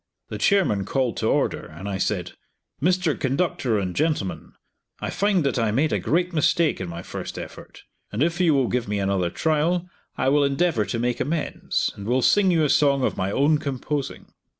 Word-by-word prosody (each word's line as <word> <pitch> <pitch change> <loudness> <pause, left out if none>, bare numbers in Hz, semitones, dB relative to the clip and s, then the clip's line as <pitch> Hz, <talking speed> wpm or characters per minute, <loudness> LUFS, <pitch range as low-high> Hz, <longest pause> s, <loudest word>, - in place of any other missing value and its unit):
The - - -5
chairman 185 - +2
called 125 +1 -1
to - - 0
order, - - +1
and 85 +6 -9
I 95 -2 -3
said, 95 -3 -1 0.5
"Mr. 180 0 +2
Conductor 135 -3 0
and 95 -3 -2
gentlemen 150 - -1 0.5
I - - -3
find 200 -3 +1
that 135 -2 0
I 115 -1 +1
made 140 +9 +1
a - - +1
great 175 +3 0
mistake 160 +1 +2
in - - -4
my 85 0 -7
first - - -6
effort, - - -10 0.3
and 110 +7 0
if 170 +2 0
you 165 -5 +4
will 135 -3 +2
give 125 -1 -1
me 105 0 -1
another 95 -3 0
trial 160 - 0 0.3
I 130 - +2
will 145 +1 +4
endeavor 140 -4 +1
to 115 - -3
make 120 +1 -1
amends, 155 +2 -1
and 100 0 -8
will 125 +2 +2
sing 205 -2 +4
you 165 -3 +3
a 150 - +2
song 140 -2 +3
of - - 0
my 95 +1 -1
own 145 +6 +3
composing." 140 0 -4
140 Hz, 195 wpm, -24 LUFS, 105-165 Hz, 0.5 s, you